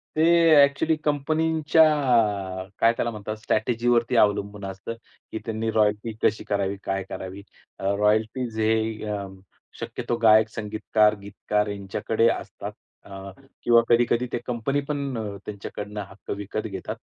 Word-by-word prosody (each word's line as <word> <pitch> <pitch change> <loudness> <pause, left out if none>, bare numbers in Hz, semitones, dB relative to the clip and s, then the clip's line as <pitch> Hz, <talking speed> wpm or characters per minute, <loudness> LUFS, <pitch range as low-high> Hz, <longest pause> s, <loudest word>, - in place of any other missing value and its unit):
ते 155 - +1 0.4
एक्चुअली 150 +3 +2
कंपनीच्या 155 +2 +2 1.0
काय 115 +1 +5
त्याला 120 - -1
म्हणतात 110 0 -5
स्ट्रॅटेजीवरती 120 +2 +1
अवलंबून 100 -1 +1
असतं 95 +4 -6 0.4
की 110 - -4
त्यांनी 110 0 -2
रॉयल्टी 105 +1 +1
कशी - - +2
करावी, 100 -1 -1
काय 95 0 -2
करावी? 95 +1 -7 0.4
अ, - - -9 0.2
रॉयल्टी 110 +4 +1
जे 110 0 +1 0.4
अ, 100 -1 -4 0.5
शक्यतो 120 - -3
गायक, 110 0 +6
संगीतकार, 110 0 +1
गीतकार 105 +1 -2
यांच्याकडे 105 +3 0
असतात - - -5 0.3
अ, 95 0 -9 0.3
किंवा 120 -1 +6
कधी-कधी 120 +1 +3
ते - - +1
कंपनी 125 +4 -1
पण 140 -4 -2
अ, 105 -2 -5
त्यांच्याकडनं 105 0 -6
हक्क 95 - -10
विकत 105 +2 -4
घेतात. 95 -3 -6
110 Hz, 130 wpm, -25 LUFS, 100-120 Hz, 1.0 s, गायक